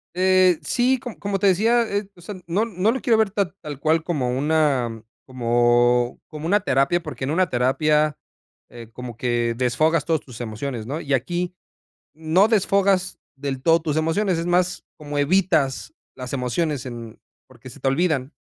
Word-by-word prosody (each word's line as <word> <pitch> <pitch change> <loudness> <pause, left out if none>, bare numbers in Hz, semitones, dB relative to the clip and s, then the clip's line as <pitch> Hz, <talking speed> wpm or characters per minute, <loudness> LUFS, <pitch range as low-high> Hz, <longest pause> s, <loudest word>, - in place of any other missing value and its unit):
Eh, 185 -2 +4
sí, 255 +1 +1
co 245 -4 -8
como 200 -1 -2
te 200 - +3
decía, 225 +6 +3
eh, 205 -2 -3
o 175 - -17
sea, 195 +4 -7
no 185 +6 0
no 210 -1 0
lo 260 - -3
quiero 235 -5 +3
ver 220 -2 +2
tal 195 -4 -2
tal 150 -4 -7
cual, 155 +2 +1
como 145 -8 -1
una 140 -6 +1 0.2
como 120 -1 +2
como 155 -1 -8
una 205 +5 +3
terapia, 140 +5 +1
porque, 155 -4 -7
en 135 - -1
una 180 +2 +1
terapia, 150 +4 +1 0.5
eh, 115 -2 -11
como 125 0 -8
que 120 -1 0
desfogas 140 +6 +1
todos 160 -1 +1
tus 125 -3 -11
emociones, 115 +1 -5
¿no? 145 +6 -4
Y 140 - -2
aquí 175 +8 -1 0.6
no 160 +6 +2
desfogas 195 -3 +1 0.2
del 135 -2 -4
todo 165 +2 +3
tus 155 -3 -2
emociones, 165 +3 +1
es 165 - -3
más, 175 0 +1
como 145 -1 -6
evitas 145 -3 +1 0.2
las 125 0 -7
emociones 135 +2 -2
en 115 -3 -8 0.3
porque, 130 +2 -14
se - - -13
te - - -2
olvidan, 145 -1 0
155 Hz, 175 wpm, -22 LUFS, 130-185 Hz, 0.6 s, Eh